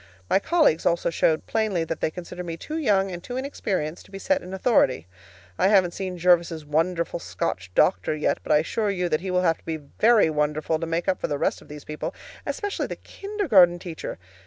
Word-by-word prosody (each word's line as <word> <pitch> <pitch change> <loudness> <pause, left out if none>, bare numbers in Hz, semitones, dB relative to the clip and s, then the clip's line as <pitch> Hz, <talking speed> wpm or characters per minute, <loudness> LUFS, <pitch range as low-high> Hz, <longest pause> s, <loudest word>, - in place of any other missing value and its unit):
My - - +5
colleagues 310 - +2
also 170 0 +1
showed 160 -1 +1
plainly 215 -6 0
that 165 0 -4
they - - +1
consider 180 +2 -7
me 165 -1 -5
too 310 - -5
young 195 -9 +2
and 175 0 -7
too 245 - -5
inexperienced 190 - -3
to - - -19
be 195 - -7
set 285 +8 0
in 180 - -9
authority. 190 - +2 0.5
I - - +4
haven't 190 -4 +4
seen 185 -2 -4
Jervis's 170 -2 +2
wonderful 165 +3 0
Scotch 95 - -3
doctor 95 +11 +3
yet, 150 - 0
but - - -4
I 150 - +7
assure 205 +7 0
you 180 -3 -1
that 155 0 0
he 190 - -4
will 180 0 +1
have 165 -2 +2
to - - -27
be 160 -1 -2
VERY 205 +6 +3
wonderful 150 +1 0
to 165 - -3
make 165 +1 -2
up 185 - 0
for - - 0
the 145 - -2
rest - - -1
of - - -16
these 150 -1 -10
people, 150 0 -5 0.3
especially 410 -1 -2
the - - -5
kindergarten 270 - +2
teacher. 170 -2 -7
175 Hz, 215 wpm, -25 LUFS, 160-195 Hz, 0.5 s, I